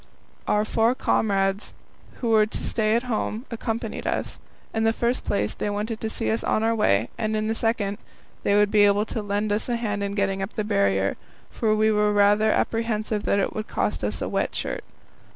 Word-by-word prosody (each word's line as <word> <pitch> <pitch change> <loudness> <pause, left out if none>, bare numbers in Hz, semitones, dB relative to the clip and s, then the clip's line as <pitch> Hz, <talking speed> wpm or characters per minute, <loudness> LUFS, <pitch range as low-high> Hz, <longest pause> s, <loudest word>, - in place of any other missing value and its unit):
Our 210 0 +2
four 225 +3 +2
comrades, 195 -4 0 0.4
who 235 - -3
were 215 -1 +5
to - - -5
stay 215 -1 +1
at 235 - +1
home, 230 -1 -2
accompanied 230 0 -3
us. - - -2 0.3
In 220 - 0
the 225 0 +3
first 235 +2 -1
place, 105 +1 -1
they - - -3
wanted 210 +2 -3
to 220 - -2
see 225 - -1
us 225 - -1
on 215 - +1
our 225 +1 +2
way, 115 - +2
and 220 -1 0
in 215 - -1
the 220 - 0
second, 225 -3 -1 0.4
they 200 - +2
would 205 0 +4
be 210 -1 +5
able 205 +1 +3
to 220 - -4
lend 205 +1 -1
us 210 +4 0
a 240 - +1
hand 210 -3 -2
in 200 0 -2
getting 195 -1 0
up 195 - -5
the 215 - -1
Barrier, 100 - +1 0.3
for 215 -1 +1
we 215 0 +3
were 210 0 +2
rather 205 +1 +4
apprehensive 220 -2 0
that - - +2
it 200 - 0
would 215 0 -4
cost - - -2
us - - -2
a - - -2
wet - - -1
shirt. - - -3
215 Hz, 210 wpm, -24 LUFS, 205-225 Hz, 0.4 s, were